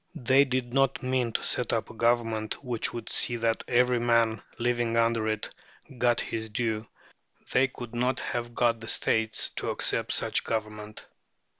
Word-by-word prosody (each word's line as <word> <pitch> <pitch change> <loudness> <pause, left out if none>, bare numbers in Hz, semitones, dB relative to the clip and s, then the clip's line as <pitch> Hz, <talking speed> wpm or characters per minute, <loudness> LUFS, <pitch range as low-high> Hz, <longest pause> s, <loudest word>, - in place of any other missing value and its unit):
They 130 +3 +4
did 125 -2 -2
not 135 -1 +2
mean 130 -2 0
to - - -1
set - - 0
up - - -1
a - - -12
government 115 -1 0
which 120 -4 -2
would 115 -2 -7
see 120 - +1
that 115 -1 0
every 125 0 +3
man 115 -2 +2 0.2
living 120 -1 0
under 115 -1 +2
it 110 -1 -2 0.5
got 120 -1 +3
his 110 -1 -4
due. 110 0 -2 0.6
They 135 +1 +4
could 120 -3 -9
not 125 +1 0
have 120 -1 -4
got 115 -2 +2
the 115 - -9
States 110 -1 +2
to - - -2
accept - - +1
such - - +2
a - - -12
government. 105 -1 -4
115 Hz, 170 wpm, -28 LUFS, 110-125 Hz, 0.6 s, They